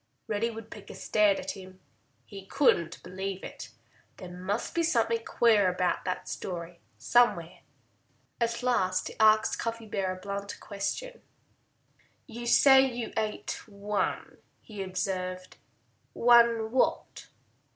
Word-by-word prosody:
Reddy 215 +2 -1
Woodpecker 225 -2 -10
stared 210 -2 +2
at - - -4
him. 185 -1 -12 0.5
He 195 -1 -11
couldn't 170 - +1
believe 190 +1 -5
it. - - -8 0.5
There 180 -1 -9
must 195 +5 -3
be 335 - +1
something 230 -7 +1
queer 215 -6 +3
about 180 0 -1
that 185 -1 -3
story, 170 -2 -6 0.2
somewhere. 170 - +2 0.8
At 235 0 -1
last 185 -7 +1
he - - -11
asked 215 0 +4
Cuffy 230 0 -4
a 190 -2 -1
blunt 200 +2 -6
question. - - -5 1.0
"You 235 -1 -8
say 265 +2 +7
you 245 -3 -3
ate 215 -1 -3
one," 205 0 -3 0.2
he 210 -3 -8
observed. 185 -1 -4 0.6
"One 235 -2 +4
what?" 260 - 0
210 Hz, 120 wpm, -28 LUFS, 185-235 Hz, 1.0 s, say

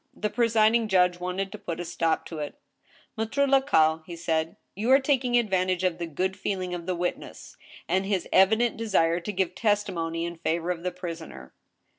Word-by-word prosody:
The 210 0 -2
presiding 230 0 +3
judge 180 -3 +3
wanted 185 +2 -3
to - - -8
put 170 - -5
a 175 - -4
stop 165 -1 0
to 160 - -7
it. 145 -1 -5 0.3
" - - -31
Maitre 225 +6 +1
Lacaille," 265 - +3
he 170 - -7
said, 165 -1 -1
" - - -49
you 215 +5 -2
are 265 +1 +7
taking 260 -3 +1
advantage 185 -5 +1
of 180 -2 0
the 170 - -3
good 185 +5 -2
feeling 185 -3 -3
of 175 -1 -6
the 185 - 0
witness, 175 +1 -5 0.3
and 190 +2 0
his 195 -3 -1
evident 220 +5 +4
desire 175 -7 +2
to 195 +4 -5
give 190 -3 -1
testimony 180 -6 -1
in 170 0 -6
favor 170 +1 -1
of 170 -2 -4
the 180 +1 -2
prisoner." 165 - -8
185 Hz, 195 wpm, -26 LUFS, 170-215 Hz, 0.3 s, are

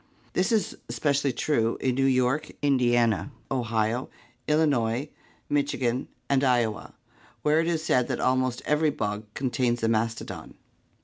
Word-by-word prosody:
This 190 +5 +1
is 220 -2 +1
especially 140 -2 +1
true 115 -3 0
in 130 - +1
New 135 +2 +2
York, 130 +3 +1
Indiana, 120 -3 +2 0.2
Ohio, 115 -1 0 0.4
Illinois, 145 -4 +1 0.4
Michi 145 0 0
gan, 125 0 0 0.2
and 140 -1 +2
Iowa, 120 -5 0 0.5
where 150 +1 +3
it 165 - +1
is 165 -2 0
said 125 -6 +2
that - - -2
almost 130 -1 +1
every 150 +1 +2
bog 105 -5 -4
contains 125 -2 0
a - - +3
mastodon. 115 0 -2
130 Hz, 135 wpm, -26 LUFS, 115-145 Hz, 0.5 s, where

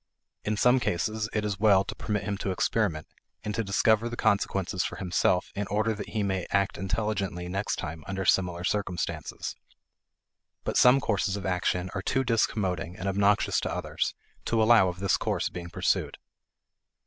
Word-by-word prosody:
In 105 0 -1
some 125 +4 +4
cases, 110 +2 -1
it 105 -1 -1
is 100 -2 -2
well 100 -3 +5
to - - -6
permit 105 -1 -2
him 105 0 -2
to 100 - -2
experiment, 95 -4 0 0.4
and 105 - -3
to 115 - -1
discover 110 +3 +2
the 120 - -6
consequences 95 -2 +1
for - - -4
himself 90 -1 +1
in 100 0 -3
order 110 +3 +1
that 105 - -7
he 110 -2 -1
may 95 -2 -1
act 100 -1 0
intelligently 95 -2 -2
next 100 +3 -2
time 80 -2 -6
under 95 0 -3
similar 90 -1 +2
circumstances. 90 -3 -3 1.1
But - - -3
some 125 +2 +6
courses 100 -3 0
of 100 - -6
action 90 0 0
are 95 - -2
too 135 +6 0
discommoding 95 -7 0
and 95 - -4
obnoxious 100 +1 +2
to - - -3
others - - -2 0.3
to 115 - +1
allow 110 -4 +6
of 90 +1 -7
this 100 - +2
course - - -1
being 85 -1 -7
pursued. 85 - 0
100 Hz, 170 wpm, -28 LUFS, 90-110 Hz, 1.1 s, some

